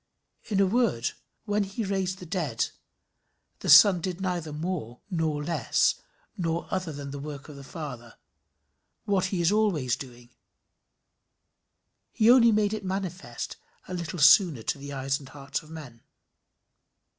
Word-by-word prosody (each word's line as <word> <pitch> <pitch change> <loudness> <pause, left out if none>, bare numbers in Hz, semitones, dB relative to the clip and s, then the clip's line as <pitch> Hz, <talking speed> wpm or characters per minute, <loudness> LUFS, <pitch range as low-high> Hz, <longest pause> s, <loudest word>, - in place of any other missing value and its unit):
In 205 -3 -1
a 195 - +5
word, 200 - +1 0.3
when 210 -1 +1
he 200 +4 -4
raised 190 -1 -1
the 180 - -10
dead, 160 - -1 0.9
the - - -4
Son 190 -4 +8
did 180 0 -4
neither 175 -4 -2
more 150 -7 -4
nor 160 -4 -1
less 150 -6 +1 0.3
nor 170 -1 -2
other 185 -3 -2
than 140 -1 -7
the 140 - -6
work 145 -1 -7
of 150 - -10
the 140 - -10
Father 125 -6 -8 0.9
what 195 -2 +1
he 185 -2 -1
is 170 - +4
always 190 - +1
doing; 120 -2 -11 1.8
he 230 0 +5
only 235 -2 +7
made 210 -1 +2
it 215 -1 -4
manifest 190 -1 -5 0.3
a - - -6
little 175 0 -4
sooner 155 - +6
to 140 - -2
the 140 +1 -8
eyes 135 0 -1
and 135 -2 -13
hearts 140 +1 -5
of 155 - -17
men. 145 -8 -10
165 Hz, 150 wpm, -27 LUFS, 140-190 Hz, 1.8 s, Son